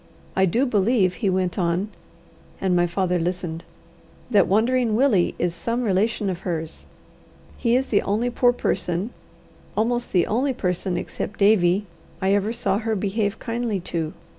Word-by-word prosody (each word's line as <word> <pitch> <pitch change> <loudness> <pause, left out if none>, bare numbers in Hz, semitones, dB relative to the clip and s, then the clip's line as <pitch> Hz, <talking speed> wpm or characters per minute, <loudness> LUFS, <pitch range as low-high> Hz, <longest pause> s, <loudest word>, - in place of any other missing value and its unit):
I 190 0 +4
do 235 +10 +2
believe," 205 -4 +2
he 200 - +2
went 185 0 0
on, 175 +3 0 0.7
and 185 -2 +1
my 175 0 +3
father 180 0 0
listened, 175 -1 -3 0.7
"that 205 - +5
Wandering 230 +2 +2
Willie 230 -8 +3
is 175 -1 0
some 230 +8 -2
relation 210 +1 +1
of 180 -2 -2
hers. 165 -4 -4 0.7
He 235 -1 +1
is 265 +1 +1
the 205 - +3
only 225 +5 0
poor 245 0 +4
person, 190 -3 -1 0.7
almost 240 +2 0
the 180 -2 +3
only 260 +5 0
person 180 -1 -1
except 220 - -5
Davie, 200 -1 +4 0.3
I 190 +2 +2
ever 205 +2 +1
saw 200 -4 0
her 225 -1 -1
behave 205 +1 -1
kindly 230 -3 -2
to. 160 -2 -1
200 Hz, 155 wpm, -23 LUFS, 180-230 Hz, 0.7 s, that